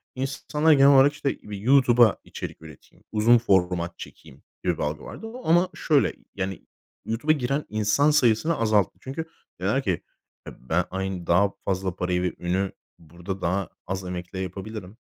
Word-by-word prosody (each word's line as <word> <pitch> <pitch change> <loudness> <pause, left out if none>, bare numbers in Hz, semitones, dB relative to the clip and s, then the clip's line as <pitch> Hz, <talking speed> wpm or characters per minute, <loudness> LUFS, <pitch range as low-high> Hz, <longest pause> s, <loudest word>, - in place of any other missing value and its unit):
insanlar 150 +4 0
genel 140 0 +6
olarak, 135 +2 +6
işte, 145 -1 -2
bir 105 -1 -7
"YouTube'a 120 -1 +5
içerik - - -8
üreteyim, 80 -4 -15
uzun 115 +3 +5
format 90 -5 +1
çekeyim" 65 - -12 0.2
gibi - - 0
bir - - -2
algı 75 0 -3
vardı. 225 - -8
O 245 +3 -9
ama, 175 +2 +4
şöyle, 150 -4 +2 0.2
yani, 95 -2 -4 0.4
YouTube'a 120 +8 +1
giren 140 +2 -1
insan 110 +8 +2
sayısını 150 +3 +3
azalttı. 110 -3 +2
Çünkü 140 +5 -5 0.4
dediler - - +1
ki, - - -1 0.5
ya, - - -9
"ben 80 +8 0
aynı, 95 -2 -4
daha 100 +4 +4
fazla 95 -1 -1
parayı 90 -1 -1
ve 90 - -1
ünü 95 +2 -1 0.3
burada 85 +4 -7
daha 90 +1 -1 0.2
az 95 0 -3
emekle 90 +1 -6
yapabilirim." 95 +2 -6
100 Hz, 160 wpm, -25 LUFS, 90-135 Hz, 0.5 s, genel